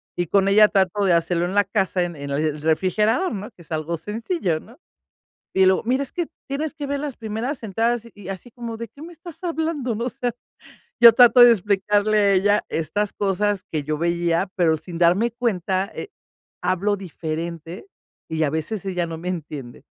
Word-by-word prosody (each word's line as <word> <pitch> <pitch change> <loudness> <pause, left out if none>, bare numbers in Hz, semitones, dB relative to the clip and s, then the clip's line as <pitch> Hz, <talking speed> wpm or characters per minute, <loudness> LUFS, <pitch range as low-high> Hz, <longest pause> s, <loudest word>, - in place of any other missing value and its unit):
y 175 -2 -1
con 195 +2 +3
ella 210 +2 +7
trato 195 0 +1
de 180 - +4
hacerlo 170 +1 +1
en 185 - -3
la 205 - +5
casa, 190 -2 0
en 175 -2 -4
en 140 0 -7
el 150 +1 -1
refrigerador, 210 - +1
¿no? 205 +1 -5
Que - - -19
es 160 - -21
algo 155 +2 -2
sencillo, 210 - -2
¿no? 235 +9 -17 0.8
Y 190 0 +5
luego: 190 - +3
"Mira, 260 +4 +1
es 275 - -7
que 345 -3 -2 0.2
tienes 295 +3 -3
que 295 -3 -5
ver 280 0 -2
las 290 -3 -5
primeras 230 +5 -4
entradas", 230 +3 -1
y 200 -2 -11
así 195 +6 -8
como: 235 -2 -7
"¿De 230 -1 -6
qué 280 - -18
me 345 +2 -9
estás 340 +2 -12
hablando?". 320 -7 -2
No, 235 +3 -3
o - - +1
sea, 245 -1 -2 0.7
ya 235 - +11
trato 245 +1 +7
de 240 0 +10
explicarle 205 +1 +2
a 200 -1 +4
ella 205 +2 +3
estas 170 +6 -1
cosas 200 0 0
que 155 -3 -2
yo 155 +1 -2
veía, 170 +1 0
pero 165 -3 +3
sin 170 +2 -9
darme 180 +7 +3
cuenta, 195 -5 -1
eh, 415 - -6 0.5
hablo 200 +3 +1
diferente, 170 - -6 0.4
y 160 0 0
a 145 - +1
veces 160 +7 -3
ella 180 -2 -1
no 165 - -6
me 180 +2 -4
entiende. 150 -7 -6
200 Hz, 200 wpm, -22 LUFS, 170-235 Hz, 0.8 s, ya